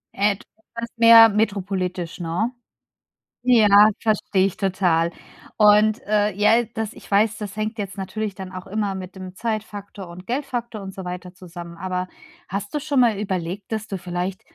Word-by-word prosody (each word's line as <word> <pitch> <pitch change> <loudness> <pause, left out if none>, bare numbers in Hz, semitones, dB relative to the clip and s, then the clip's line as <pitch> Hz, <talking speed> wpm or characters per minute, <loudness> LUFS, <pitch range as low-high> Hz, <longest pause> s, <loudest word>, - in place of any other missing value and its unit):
Äh, 205 0 +2
du - - -18 0.3
magst 235 0 -6
mehr 230 0 +9
metropolitisch, 190 -4 -2
ne? 175 +8 -1 0.9
Ja, 210 -4 +7
verstehe 205 -3 +1
ich 195 - -2
total. 180 -4 +1 0.5
Und, 210 +1 +5
äh, 210 0 +2
ja, 210 +3 +4
äh, 240 - -2
das 220 0 -3
ich - - -15
weiß, 215 +2 +3
das 210 -2 -6
hängt 215 +2 -3
jetzt 200 -1 -5
natürlich 205 +2 -4
dann 190 -1 -8
auch 185 0 -7
immer 200 0 -2
mit 185 0 -8
dem 185 -1 -9
Zeitfaktor 205 -3 -5
und 175 +2 -11
Geldfaktor 240 -3 -3
und 190 0 -8
so 190 - -7
weiter 180 0 -7
zusammen, 175 -2 -10
aber 185 0 -3 0.4
hast 200 +4 -5
du 295 - 0
schon 285 -2 +1
mal 225 -5 +3
überlegt, 190 0 -4
dass 220 0 -3
du 195 - -4
vielleicht 180 +1 -4
200 Hz, 175 wpm, -22 LUFS, 185-215 Hz, 0.9 s, mehr